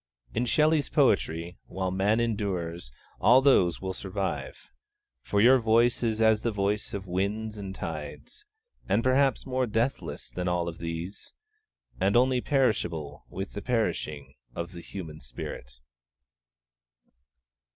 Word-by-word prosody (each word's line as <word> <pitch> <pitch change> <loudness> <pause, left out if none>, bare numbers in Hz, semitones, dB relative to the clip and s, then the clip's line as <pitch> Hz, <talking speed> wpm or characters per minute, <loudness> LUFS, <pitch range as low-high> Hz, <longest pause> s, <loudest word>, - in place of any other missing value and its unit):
In 120 +1 0
Shelley's 155 +2 +3
poetry, 90 - +1
while 95 -1 -2
Man 100 +4 +2
endures, 90 - -2 0.3
all 125 +3 +7
those 130 -11 +4
will 95 -1 -3
survive; 95 0 -4 0.5
for 100 - 0
your 125 +5 +7
'voice 115 +1 +3
is 110 -2 0
as 110 -1 +4
the 120 - 0
voice 105 0 -1
of 100 -1 -5
winds 100 +4 -2
and 100 -2 -6
tides,' 80 - -7 0.5
and 105 +4 +2
perhaps 135 +1 +3
more 130 -1 0
deathless 115 +4 -2
than 90 0 -3
all 90 -1 0
of 85 -1 -6
these, 85 +3 -5 0.7
and 100 +5 +3
only 125 0 +3
perishable 105 - 0
with 95 +1 -6
the 100 - -5
perishing 85 - -2 0.2
of 85 +1 -4
the 85 -2 -9
human 80 -4 -8
spirit. - - -8
100 Hz, 130 wpm, -28 LUFS, 85-120 Hz, 0.7 s, all